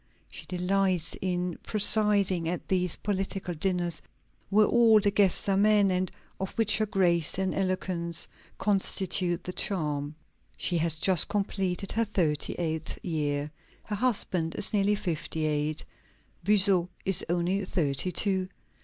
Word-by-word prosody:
She - - -8
delights 185 -1 0
in 180 -2 -2
presiding 205 -5 +2
at 175 - -5
these 180 -2 +1
political 195 -2 -3
dinners 175 0 -2 0.5
where 210 +1 +4
all 230 -2 +5
the 205 0 +1
guests 200 -2 +3
are 195 - +2
men, 205 -1 +4
and 185 0 -1 0.3
of 190 - -3
which 215 -1 +2
her 215 - +1
grace 175 -6 +2
and 190 -1 -1
eloquence 185 -3 -2 0.3
constitute 190 -3 0
the 180 - -6
charm. 150 -7 -2 0.4
She 175 -2 0
has 160 -1 +1
just 185 -1 +2
completed 195 -2 -2
her 230 0 +1
thirty 165 -8 -1
eighth 160 -2 -4
year. 150 -3 -2 0.3
Her 210 - -4
husband 195 -8 0
is - - +1
nearly 205 0 +2
fifty 160 -4 -3
eight; 150 0 -1 0.6
Buzot 190 -2 +4 0.2
is 195 -2 +3
only 175 +3 0
thirty 165 -2 0
two. 190 0 +1
185 Hz, 135 wpm, -28 LUFS, 170-200 Hz, 0.6 s, all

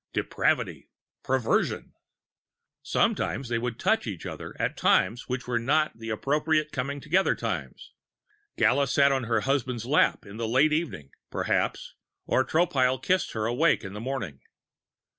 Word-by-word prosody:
Depravity! - - -1 0.3
Perversion! 130 -3 0 0.9
Sometimes 135 -3 0
they 115 -1 0
would 120 -1 -3
touch 220 - +1
each 95 -7 -5
other - - -7
at - - -1
times 115 +8 +2
which 125 0 -3
were 120 -1 0
not 150 +6 +1
the 115 0 -6
appropriate 150 +6 0
coming 140 +2 -3
together 175 +7 +2
times, - - -5 0.6
Gala 140 +1 +3
sitting 140 +2 +4
on 135 -2 0
her 115 -1 +1
husband's 125 -3 -1
lap 145 +5 +2
in 100 +2 -10
the 115 -1 -2
late 135 +7 +3
evening, 140 - -3 0.2
perhaps, - - -1 0.3
or 130 - +2
Tropile 135 -6 +2
kissing 185 +8 0
her 110 -1 -2
awake 145 +8 +2
in 95 - -7
the 105 - -6
morning. 115 - -4
130 Hz, 145 wpm, -27 LUFS, 115-150 Hz, 0.9 s, sitting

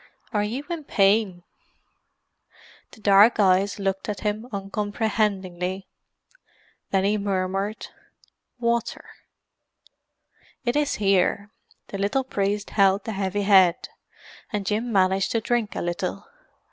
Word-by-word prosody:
"Are 210 - +2
you 235 +7 -3
in 340 -3 -4
pain?" 195 -4 +2 1.5
The - - -17
dark 205 +3 +6
eyes 195 0 +3
looked 195 0 -2
at 205 -3 -4
him 215 +2 -2
uncomprehendingly. 195 -2 -2 1.0
Then 195 -1 +1
he 210 +2 +1
murmured, 195 +1 -2 0.7
"Water!" 235 -1 -1 1.6
"It 240 - 0
is 295 -1 +1
here." 200 +1 +1 0.4
The 195 - -5
little 235 +7 0
priest 205 -4 -2
held 195 -1 +3
the 225 - -4
heavy 200 0 -2
head, 190 -3 +4 0.6
and 205 -2 -3
Jim 220 +4 -1
managed 190 -1 +2
to 230 - +2
drink 225 -1 -1
a - - -3
little. 175 - -3
200 Hz, 115 wpm, -24 LUFS, 195-215 Hz, 1.6 s, dark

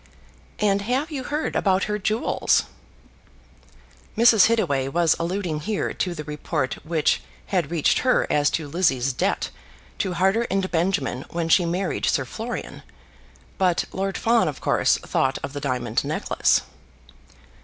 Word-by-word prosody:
"And 200 -1 +2
have 260 +9 -1
you 275 -3 -4
heard 300 +4 -2
about 190 -1 +2
her 210 0 -2
jewels?" 215 +3 +1 1.5
Mrs. 225 -4 +6
Hittaway 150 -13 +1
was 165 +3 +2
alluding 170 -2 -2
here 205 +7 -2
to 180 -2 -2
the 155 - -5
report 150 -2 -3
which 155 -2 +1 0.3
had 175 -6 +1
reached 165 -3 +2
her 255 - +2
as 145 -1 +2
to 160 -3 -3
Lizzie's 140 -5 +1
debt - - -1 0.5
to 185 - -1
Harter 195 +7 +2
and 190 -1 -1
Benjamin 165 -7 0
when 170 -1 -2
she 175 +1 +4
married 180 +1 -1
Sir - - +1
Florian; - - -6 0.8
but 180 -3 +2
Lord 195 0 -2
Fawn 230 -3 +3
of 150 - -4
course - - +2
thought 135 - 0
of 140 - -5
the 145 - -5
diamond 125 -5 -1
necklace. - - +1
175 Hz, 145 wpm, -23 LUFS, 150-200 Hz, 1.5 s, Mrs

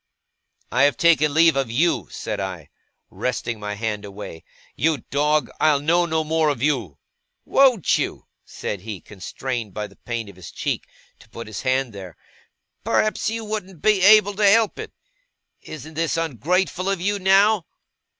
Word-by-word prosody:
'I 125 - +2
have 145 - +2
taken 155 -3 +4
leave 160 +1 +5
of 135 -3 0
you,' 160 +9 +1
said - - -5
I, 95 -6 -5 0.4
wresting 120 -2 -3
my 105 0 -4
hand 105 -1 -3
away. 100 -5 -9 0.3
'You 155 -2 0
dog, 150 +2 +1
I'll 150 -2 +4
know 170 +4 +2
no 160 -1 0
more 160 0 +1
of 140 -4 -2
you.' 120 - 0 0.5
'Won't 255 - +3
you?' - - -3 0.2
said 100 - -6
he, 105 -2 -6
constrained 110 +4 -6
by 105 - -3
the 100 -1 -15
pain 120 -2 -5
of 100 -2 -13
his 90 -2 -10
cheek - - -3 0.3
to - - -19
put 115 +1 -8
his 110 -1 -6
hand 130 -2 0
there. 95 -4 -10 0.7
'Perhaps 215 0 +1
you 225 0 -4
won't 195 -6 -6
be 210 -3 +3
able 205 +1 +6
to 205 -2 +5
help 225 +1 +3
it. - - -6 0.7
Isn't 155 +1 -9
this 165 +1 -1
ungrateful 175 - -1
of 195 -2 0
you, 200 +3 -1
now? 195 0 +4
150 Hz, 165 wpm, -22 LUFS, 110-180 Hz, 0.7 s, able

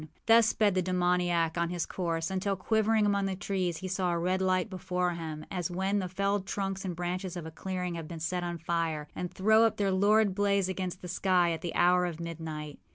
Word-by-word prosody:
Thus 225 -1 +6
sped 215 -3 +2
the 185 - +2
demoniac 175 -2 +1
on 170 0 +1
his 175 -1 -2
course, 165 -2 -2
until, 195 +1 0
quivering 220 +3 +2
among 200 -1 +1
the 190 - -2
trees, 185 -3 -2
he 190 - -5
saw 185 -1 0
a 170 - 0
red 185 +2 0
light 185 +1 +2
before 180 -2 -1
him, 160 -3 -6
as 180 -3 -2
when 190 +3 0
the 185 -2 -3
felled 200 +1 -1
trunks 195 -1 -3
and 180 -3 -3
branches 180 +1 -3
of 170 - -6
a 160 - -7
clearing 180 +1 -4
have 165 -2 -6
been 165 0 -7
set 175 +2 -2
on 175 -1 -3
fire, 165 -2 -2
and 180 - -4
throw 220 +3 +4
up 225 - +2
their 200 -1 +1
lurid 205 +1 +3
blaze 200 -1 +2
against 185 -1 -4
the - - -5
sky, 180 -1 +2
at 165 - -3
the 175 - -4
hour 180 0 +4
of 170 -2 -6
midnight. 160 -3 -6
180 Hz, 220 wpm, -30 LUFS, 170-195 Hz, -, Thus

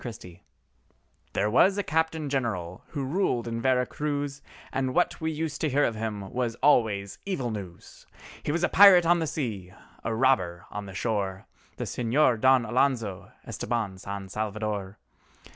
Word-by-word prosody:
EL - - -13
CAPITAN 115 -4 -6
GENERAL 90 -1 -13 0.9
There 105 +2 +1
was 190 - +4
a 205 - 0
Captain 160 -1 0
General 110 -11 -3
who 145 -3 -4
ruled 130 -6 0
in 115 0 -3
Vera 125 0 +2
Cruz, 145 0 -3 0.3
And 130 0 -1
what 175 0 +1
we 160 - 0
used 155 -1 -4
to 155 - +1
hear 145 +2 +2
of 115 - +1
him 105 -3 -5
was 120 -2 -1
always 105 -8 +2
evil 135 -12 -2
news; 95 -5 -9 0.3
He - - -2
was 170 +3 -1
a - - +5
pirate 190 -3 +8
on 175 +1 +4
the 160 - -1
sea—a 110 - -5
robber 95 -9 +1
on 105 -1 -6
the 95 - -9
shore: 100 -4 -2 0.3
The - - -3
Señor 120 -1 +1
Don 130 -2 +5
Alonzo 115 -7 0
Estabán 110 -5 -3
San 100 0 -6
Salvador. 105 -1 -3
120 Hz, 165 wpm, -27 LUFS, 100-145 Hz, 0.9 s, pirate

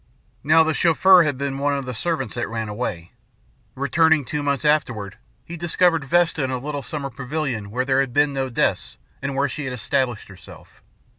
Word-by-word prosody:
"Now 160 +3 +5
the 160 0 0
Chauffeur 180 +3 +5
had 145 -5 0
been 140 0 -3
one 145 0 +1
of 135 - -5
the 125 - -5
servants 165 +8 -2
that 120 0 -3
ran 110 -1 -4
away. 95 -6 -5 0.6
Returning, 150 +2 +2
two 150 +3 -3
months 140 0 -1
afterward, 120 -10 0 0.3
he 170 - -7
discovered 170 -2 +1
Vesta 165 0 +2
in 130 - -1
a 130 - -2
little 145 +2 -5
summer 140 0 -5
pavilion 125 -5 -4
where 125 +4 -2
there 135 0 +2
had 135 -2 0
been 145 +2 +2
no 135 -1 -2
deaths 120 - -1 0.2
and 140 0 -3
where 140 +1 +1
she 150 - -5
had 130 - -4
established 125 -1 -2
herself. 95 -3 -15
140 Hz, 195 wpm, -22 LUFS, 125-155 Hz, 0.6 s, Now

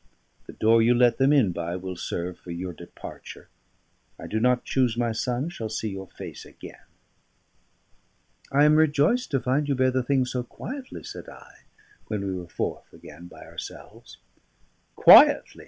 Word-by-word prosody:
The - - -10
door 115 +1 +3
you 120 +2 +4
let 120 +1 +3
them 135 +2 +4
in 130 -11 +3
by 85 0 -4
will 95 0 -6
serve 90 0 -5
for - - -15
your 90 +1 -5
departure. 85 +1 -11 0.7
I - - -10
do 110 - -2
not 125 +1 +1
choose 125 -4 0
my 120 -1 0
son 125 +6 -2
shall 115 -10 -6
see 110 0 -3
your 95 -1 -7
face - - -10
again." - - -13 1.7
"I 140 +2 +4
am 150 +1 +5
rejoiced 160 - +2
to 135 - 0
find 135 +4 0
you 140 - +1
bear 130 0 +2
the 130 0 0
thing 130 +1 +1
so 125 0 -3
quietly," 260 - -8
said - - -9
I, - - -16 0.4
when 105 -2 -3
we 95 - -3
were 90 -2 -7
forth - - -5
again 80 +4 -13
by - - -14
ourselves. - - -11 0.8
"Quietly!" - - +7
120 Hz, 170 wpm, -25 LUFS, 95-135 Hz, 1.7 s, Quietly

